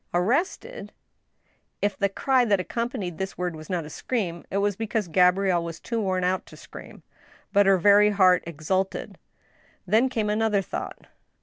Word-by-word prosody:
"Arrested!" 335 - -1 0.9
If 205 -1 0
the 200 +1 0
cry 260 +5 +2
that 205 -4 +2
accompanied 215 -4 -4
this 190 0 -4
word 180 -2 -3
was 155 0 -11
not 175 -4 -2
a - - -9
scream, 180 -8 -3
it 195 - -2
was 205 0 +1
because 220 -1 -2
Gabrielle 180 +1 +3
was 165 -1 -7
too 230 -1 -3
worn 185 -2 -1
out 185 +1 -1
to - - -14
scream. - - -12 0.5
But 200 -1 +4
her 195 -1 +5
very 205 +3 +5
heart 185 -3 +4
exulted. 180 +4 -3 0.7
Then 220 +7 +3
came 220 -4 -1
another 210 -2 +1
thought. - - -6
195 Hz, 165 wpm, -25 LUFS, 180-220 Hz, 0.9 s, her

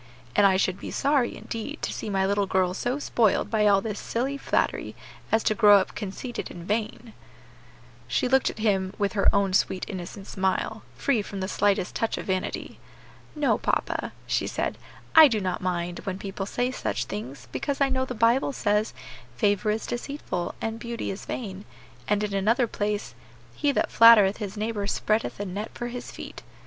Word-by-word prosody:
And 200 - +6
I 190 -1 +3
should 185 0 0
be - - -6
sorry, 275 -4 +1
indeed, 225 -1 -6
to - - -1
see - - -5
my 195 -1 +1
little 200 0 +1
girl 185 -1 +1
so 245 +7 -1
spoiled 230 -7 +1
by 215 -2 +3
all 200 -1 +5
this 210 -1 -4
silly 260 +4 -2
flattery 280 - -1 0.4
as 220 0 +3
to - - +2
grow 210 -2 +7
up 190 - -1
conceited 215 +5 -5
and 175 0 -9
vain." 220 +1 -2 0.9
She 130 - +1
looked 265 +1 +3
at - - -8
him 195 -4 0
with 200 -2 0
her 200 - +4
own 200 -2 +1
sweet 185 -1 +1
innocent 190 +1 -7
smile, 190 +4 -1
free 260 -6 +1
from 200 -1 -7
the 190 - -2
slightest 200 -2 +1
touch 225 - -1
of - - -5
vanity. 190 -2 -3 0.6
"No, 295 -2 +2
papa," - - -1
she - - 0
said, - - -2 0.4
"I 320 -1 +11
do 225 -5 0
not 185 -2 -2
mind, 175 -1 -2
when 190 -1 -4
people 195 0 -5
say 245 +4 -1
such - - -2
things, 140 -11 -7
because 280 -2 -2
I 275 -1 +3
know 260 0 0
the 255 -1 -4
Bible 235 +5 +3
says, 210 -2 0 0.4
'Favor 205 - +1
is 215 +1 -1
deceitful, 240 -8 -4
and 225 0 -3
beauty 235 -2 -4
is 195 - -7
vain;' 200 -5 -5 0.4
and 210 0 +1
in 205 -1 -2
another 225 +6 +2
place, 205 - -3 0.4
'He 290 - +1
that - - 0
flattereth 220 -4 +7
his 210 -1 -5
neighbor 210 -1 -2
spreadeth 215 +1 0
a 205 - -2
net 200 +4 -4
for 240 - -4
his 245 0 -6
feet.' - - -9
210 Hz, 185 wpm, -26 LUFS, 195-230 Hz, 0.9 s, I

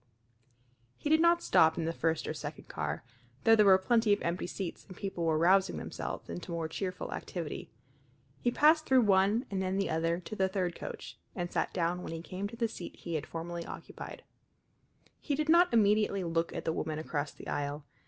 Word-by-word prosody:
He 295 - -2
did 315 0 +5
not 340 0 +4
stop 160 0 +4
in 165 - -1
the 165 - -1
first 165 -1 0
or - - -2
second - - -7
car, 75 +1 -3 0.4
though 225 - +7
there 210 -2 +5
were 190 -1 +8
plenty 225 +3 +2
of - - 0
empty 170 +1 -1
seats 185 -1 -5
and 185 - -11
people 190 -4 -3
were 160 -1 +2
rousing 190 +4 +4
themselves - - -5
into 175 0 -6
more 165 -1 -2
cheerful 185 +3 -4
activity. 170 -4 -5 0.7
He 245 - +1
passed 310 +5 +4
through 260 -1 +6
one 205 +3 +3
and 190 -1 -1
then 190 0 -1
the 195 - 0
other 165 +2 +1
to 185 +4 -7
the 190 -2 +1
third 185 -2 -1
coach, - - -8 0.2
and 175 -1 -3
sat - - 0
down 175 0 -1
when 165 - -6
he 165 - -5
came 190 +3 -4
to 225 - -9
the 230 -1 +1
seat 200 -5 -8
he 170 - -7
had 155 -3 -2
formerly 170 +1 -5
occupied. - - -8 1.0
He 290 - -1
did 305 +2 -1
not 345 +2 +6
immediately 210 -3 +3
look 165 0 0
at - - -5
the 160 - +1
woman 155 -1 -2
across 150 -2 -3
the - - -12
aisle. 145 +1 -3
185 Hz, 205 wpm, -31 LUFS, 165-215 Hz, 1.0 s, were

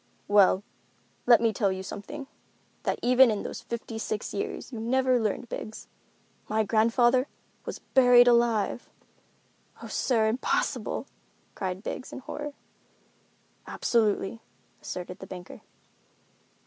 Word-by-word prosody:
"Well, 200 -1 +5 0.6
let 240 -1 +7
me 225 -1 +2
tell 200 -1 +1
you 190 0 -4
something, 270 +9 -7 0.6
that - - -1
even 250 +1 +6
in 210 -2 -1
those - - -6
fifty 230 -1 -6
six 215 -1 -3
years 205 - -4
you 230 - -5
never 255 +2 +2
learned, 220 +2 -2
Biggs. 220 -1 -7 0.6
My 220 +1 +2
grandfather 240 +4 +3 0.4
was - - -4
buried 245 -2 +5
alive!" 235 -2 +2 0.9
"Oh, - - -6
sir! 225 -4 +1
Impossible!" 225 +4 -1 0.5
cried 185 +1 -4
Biggs, 255 - -5
in - - -7
horror. 295 +2 -6 1.1
"Absolutely," 225 -1 0 0.4
asserted 180 +1 -6
the 190 - -9
banker. 180 0 -9
225 Hz, 120 wpm, -27 LUFS, 205-245 Hz, 1.1 s, let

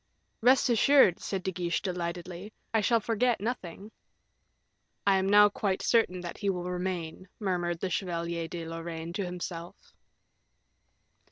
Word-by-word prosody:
"Rest 255 +4 +5
assured," 245 -4 +5
said 190 -2 -4
De 190 - -1
Guiche, 175 -2 -1
delightedly, 180 +1 -4 0.2
"I 220 - +3
shall 230 +2 +3
forget 230 +1 +1
nothing." 205 -2 -5 1.1
"I 195 -1 +5
am 190 0 0
now 205 +1 +8
quite 200 -2 -2
certain 205 -6 +2
that 175 - -6
he 200 - 0
will 180 -2 -1
remain," 180 -1 -4
murmured 175 -4 -1
the 185 - -2
Chevalier 170 -2 -2
de 170 -1 -6
Lorraine 165 0 -6
to 200 - -2
himself. 175 -1 -7
185 Hz, 140 wpm, -29 LUFS, 170-205 Hz, 1.1 s, now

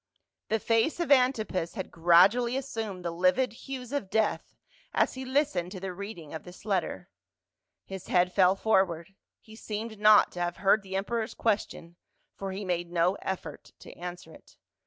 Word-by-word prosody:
The 220 - +1
face 225 +9 +1
of 340 -4 -1
Antipas 225 -10 +2
had 190 - -5
gradually 190 +9 +4
assumed 220 -9 -5
the 170 - -1
livid 185 +8 +2
hues 255 0 -8
of 250 -10 -2
death 220 +1 -1 0.4
as - - +2
he 260 - -6
listened 260 - 0
to 190 - -6
the 190 0 -5
reading 185 -5 -8
of 160 - -5
this 180 +3 -13
letter. 200 -3 -2 0.8
His 190 -1 -8
head 180 0 +2
fell 185 -1 +4
forward; 190 -4 +1 0.3
he 220 - -15
seemed 220 0 -6
not 210 0 +6
to 180 - -8
have 175 0 -2
heard 200 +2 +3
the 190 -1 -7
emperor's 220 +3 -2
question 185 -6 -2 0.4
for 195 -1 -5
he 195 +2 -5
made 175 -1 -2
no 175 +1 +2
effort 190 -1 -6
to - - -11
answer 175 -2 -8
it. - - -18
195 Hz, 170 wpm, -28 LUFS, 180-225 Hz, 0.8 s, not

